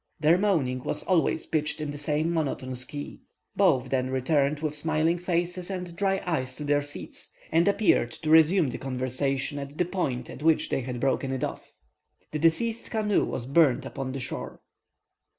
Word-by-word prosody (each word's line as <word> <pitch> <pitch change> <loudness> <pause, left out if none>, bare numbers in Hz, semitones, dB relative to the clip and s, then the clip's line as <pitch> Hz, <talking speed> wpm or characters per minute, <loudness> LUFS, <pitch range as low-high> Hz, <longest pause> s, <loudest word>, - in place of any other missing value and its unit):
Their 160 +4 +4
moaning 140 -11 +1
was - - -2
always 170 -3 +1
pitched 150 -1 -1
in 150 -1 -3
the 145 - -7
same 155 +3 0
monotonous 130 -5 -2
key. 145 +2 -7 0.3
Both 140 -10 +3
then 130 -1 +1
returned 140 +2 +1
with 155 -1 -2
smiling 160 +3 +1
faces 175 +1 -2
and 180 -3 -5
dry 195 0 0
eyes 130 -7 -2
to 150 - -6
their 145 0 +2
seats, 145 0 -9 0.2
and 165 +3 +3
appeared 200 - +3
to 155 - 0
resume 160 -1 +5
the - - -6
conversation 135 +2 -2
at 140 +1 -8
the 180 - +2
point 135 -10 -2
at - - -9
which 160 0 +3
they - - 0
had 125 -1 -5
broken 135 +1 0
it 130 - -2
off. - - -5 0.6
The 155 - -2
deceased's 220 +9 +1
canoe 210 -3 +1
was 120 - -4
burnt 140 -1 +3
upon 130 -1 -5
the 135 - -4
shore. 125 - -6
150 Hz, 180 wpm, -27 LUFS, 135-170 Hz, 0.6 s, resume